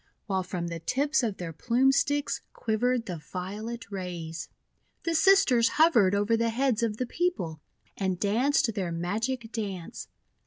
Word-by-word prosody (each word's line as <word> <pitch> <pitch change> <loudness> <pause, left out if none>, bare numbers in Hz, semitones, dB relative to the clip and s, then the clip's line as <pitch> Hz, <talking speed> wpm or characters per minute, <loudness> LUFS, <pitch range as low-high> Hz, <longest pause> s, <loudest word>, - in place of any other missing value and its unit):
While 190 -3 0
from 180 -1 -4
the 170 -1 -5
tips 280 - +1
of 220 -5 -2
their 170 -2 -5
Plume 245 - +3
Sticks 285 +1 0
quivered 235 +2 0
the 180 -4 -4
violet 210 +8 -6
rays. 175 -4 -5 0.5
The 335 - 0
Sisters 320 -9 +5
hovered 235 - +5
over 205 +3 +2
the 230 0 +1
heads 240 -1 +1
of 220 -2 0
the 255 - -1
people, 210 - -2 0.3
and 190 -2 -1
danced 230 +3 +2
their 190 -4 -2
magic 220 +8 -2
dance. 195 -7 -5
225 Hz, 150 wpm, -28 LUFS, 185-255 Hz, 0.5 s, Sisters